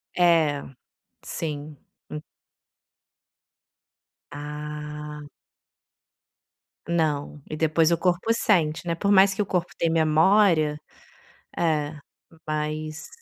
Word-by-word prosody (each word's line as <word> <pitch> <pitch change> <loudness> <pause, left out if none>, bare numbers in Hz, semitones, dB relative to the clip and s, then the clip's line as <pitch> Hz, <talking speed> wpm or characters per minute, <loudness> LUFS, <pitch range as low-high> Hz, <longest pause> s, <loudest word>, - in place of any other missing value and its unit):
É, 165 -5 +3 0.6
sim. 150 -2 -5 0.3
Hum 150 - -5 2.1
Ah. 150 0 -7 1.6
Não, 150 -4 -1
e 155 - -4
depois 160 +1 +2
o 170 - +3
corpo 180 +6 +1
sente, 175 -8 +1
né, 170 - 0
por 200 +4 -1
mais 195 0 +6
que 200 - -1
o - - 0
corpo 180 -2 -1
tem 165 - +1
memória, 160 0 +4 0.8
é 155 -3 0 0.5
mas 155 +1 -3
155 Hz, 90 wpm, -25 LUFS, 150-170 Hz, 2.1 s, mais